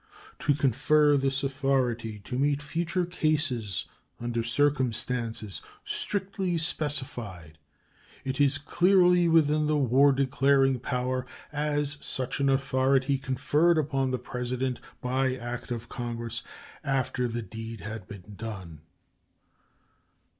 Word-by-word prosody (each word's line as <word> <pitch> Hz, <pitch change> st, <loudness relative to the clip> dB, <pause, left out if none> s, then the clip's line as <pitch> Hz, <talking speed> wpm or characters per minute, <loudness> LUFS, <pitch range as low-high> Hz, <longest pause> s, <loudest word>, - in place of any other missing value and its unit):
To 145 Hz, -, +2 dB
confer 145 Hz, +2 st, +3 dB
this 135 Hz, 0 st, 0 dB
authority 130 Hz, -5 st, 0 dB
to 115 Hz, -, -6 dB
meet 140 Hz, +2 st, +2 dB
future 170 Hz, +3 st, -1 dB
cases 155 Hz, -, 0 dB, 0.3 s
under 120 Hz, -1 st, -2 dB
circumstances 120 Hz, -5 st, -1 dB, 0.2 s
strictly 190 Hz, -3 st, -1 dB
specified 125 Hz, -, -2 dB, 0.7 s
is 135 Hz, +1 st, -1 dB
as 140 Hz, 0 st, +4 dB
clearly 180 Hz, +3 st, +4 dB
within 155 Hz, -2 st, +4 dB
the 150 Hz, 0 st, +2 dB
war 140 Hz, +1 st, +5 dB
declaring 135 Hz, 0 st, +3 dB
power 125 Hz, +1 st, -2 dB, 0.2 s
as 145 Hz, -1 st, -1 dB
such 130 Hz, +1 st, -3 dB
an 140 Hz, 0 st, +3 dB
authority 135 Hz, 0 st, +2 dB
conferred 145 Hz, +6 st, +2 dB
upon 135 Hz, -3 st, +1 dB
the 130 Hz, -, 0 dB
President 125 Hz, +1 st, -3 dB, 0.2 s
by 130 Hz, +1 st, +1 dB
act 120 Hz, -1 st, -6 dB
of 115 Hz, -1 st, -4 dB
Congress 115 Hz, -1 st, -4 dB, 0.4 s
after 130 Hz, -3 st, 0 dB
the 120 Hz, 0 st, -3 dB
deed 110 Hz, +1 st, -7 dB
had 110 Hz, +3 st, -7 dB
been 100 Hz, -3 st, -9 dB
done. 95 Hz, -8 st, -7 dB
130 Hz, 110 wpm, -28 LUFS, 120-145 Hz, 0.7 s, war